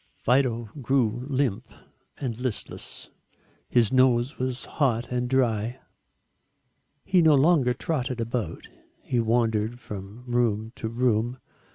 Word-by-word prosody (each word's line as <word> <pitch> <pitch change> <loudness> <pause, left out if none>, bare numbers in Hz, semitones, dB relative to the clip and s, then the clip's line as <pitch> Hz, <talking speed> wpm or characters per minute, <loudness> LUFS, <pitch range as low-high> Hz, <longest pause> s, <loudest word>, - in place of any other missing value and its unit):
Fido 120 -3 +1
grew 125 -1 +1
limp 130 -6 0 0.5
and 125 -5 -3
listless. 125 -3 -4 0.6
His 120 -1 +3
nose 130 0 +3
was 130 0 -2
hot 125 -5 0
and 125 0 -1
dry. 120 -2 +1 1.3
He 185 -2 +4
no 160 -2 +6
longer 135 -4 +4
trotted 130 -6 -2
about, 115 -6 -3 0.4
he 125 - 0
wandered 115 0 +1
from 105 +1 -8
room 115 -3 0
to 110 - -3
room. 120 0 +1
120 Hz, 110 wpm, -26 LUFS, 115-130 Hz, 1.3 s, no